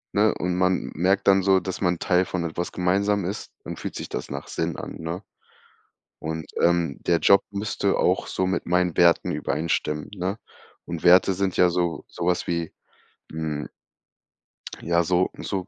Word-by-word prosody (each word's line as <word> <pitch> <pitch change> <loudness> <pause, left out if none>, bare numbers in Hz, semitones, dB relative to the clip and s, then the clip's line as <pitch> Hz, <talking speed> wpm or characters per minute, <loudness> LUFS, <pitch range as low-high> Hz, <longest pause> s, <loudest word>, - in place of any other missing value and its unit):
ne, - - +4
und 90 0 -1
man 90 0 +1
merkt 95 +5 +1
dann 95 0 +6
so, 95 0 +4
dass 95 0 -5
man 90 -2 +1
Teil 90 +2 +2
von 90 -1 -3
etwas 85 +1 -3
gemeinsamen 100 +2 +1
ist, 95 +3 -5
dann - - -6
fühlt - - -6
sich - - -6
das - - -5
nach - - -6
Sinn - - -3
an, - - -7
ne? 85 +4 -5 1.0
Und, 80 0 -4 0.2
ähm, 85 -4 +2
der 85 - +4
Job 100 - +6
müsste 100 +1 -1
auch - - +2
so 95 - -1
mit 95 - -1
meinen 90 -1 +1
Werten 85 -1 +4
übereinstimmen, 75 -1 -2
ne? 95 +2 -3 0.5
Und 85 -1 -6
Werte 90 +2 +6
sind 95 -1 -1
ja 90 -1 +5
so 85 -1 -1
so 85 - -5
was 90 -1 +1
wie, 85 -1 -2 0.6
hm, 80 -2 -3 1.1
ja, 85 0 +2
so 90 +2 +2
so, 95 -3 -3
90 Hz, 170 wpm, -24 LUFS, 85-95 Hz, 1.1 s, dann